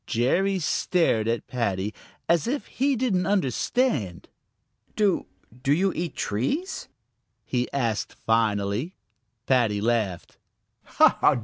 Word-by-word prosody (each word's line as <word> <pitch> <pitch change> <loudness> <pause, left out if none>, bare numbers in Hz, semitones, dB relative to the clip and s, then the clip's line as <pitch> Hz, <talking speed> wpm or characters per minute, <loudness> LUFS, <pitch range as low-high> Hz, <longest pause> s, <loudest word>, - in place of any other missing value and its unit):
Jerry 190 - +1
stared 165 - +1
at 115 0 -1
Paddy 105 -4 -2 0.3
as 170 +2 +2
if 275 +4 -2
he 275 +2 0
didn't 215 -8 0
understand. 150 - 0 0.7
"Do 205 -4 +1 0.3
do 135 - 0
you 185 +5 +2
eat 170 0 -4
trees?" 280 - -2 0.6
he 125 -1 -1
asked 115 -6 -1
finally. 110 - +1 0.5
Paddy 115 -6 +2
laughed. 110 -5 -1
130 Hz, 100 wpm, -25 LUFS, -, 0.7 s, as